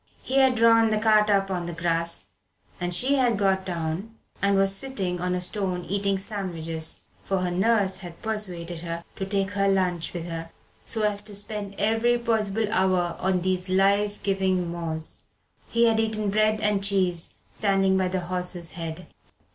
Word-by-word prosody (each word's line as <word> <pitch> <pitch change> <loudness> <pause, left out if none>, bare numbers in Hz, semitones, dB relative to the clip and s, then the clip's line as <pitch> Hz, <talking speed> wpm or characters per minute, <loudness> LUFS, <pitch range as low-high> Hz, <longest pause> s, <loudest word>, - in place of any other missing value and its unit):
He 270 +1 +1
had 265 -2 +5
drawn 230 -1 +5
the 215 - +1
cart 215 -1 +4
up 195 -1 +2
on 175 -2 -2
the 175 - -4
grass, 170 0 0 0.5
and 175 0 -2
she 260 +10 +2
had 245 -5 +2
got 190 -1 +1
down 175 +5 -3 0.3
and 200 0 +3
was 195 0 +3
sitting 195 -7 -2
on 180 0 0
a 180 - -2
stone 180 -2 -2
eating 195 +1 0
sandwiches, 170 -6 -2 0.2
for 195 -1 -1
her 180 -1 -1
nurse 195 0 +2
had 175 -3 -10
persuaded 180 -6 -2
her 170 0 -5
to 195 - -2
take 195 0 0
her 200 -1 +1
lunch 185 -3 +1
with 170 -2 -5
her 165 -1 -5 0.4
so 220 -1 0
as 205 -1 +2
to 210 -1 -8
spend 205 0 -4
every 225 +3 +2
possible 225 -2 0
hour 185 -4 +2
on 185 -1 +1
these 185 0 -1
life 200 +2 +2
giving 190 -3 0
moors. 160 -2 -5 0.5
He 230 0 +3
had 225 -1 +3
eaten 215 -2 0
bread 215 +1 +2
and 210 -2 +1
cheese 185 -4 +1 0.2
standing 195 -2 +2
by 190 -1 +2
the 185 0 -2
horse's 180 -1 -3
head. 165 +1 -6
195 Hz, 175 wpm, -25 LUFS, 180-210 Hz, 0.5 s, had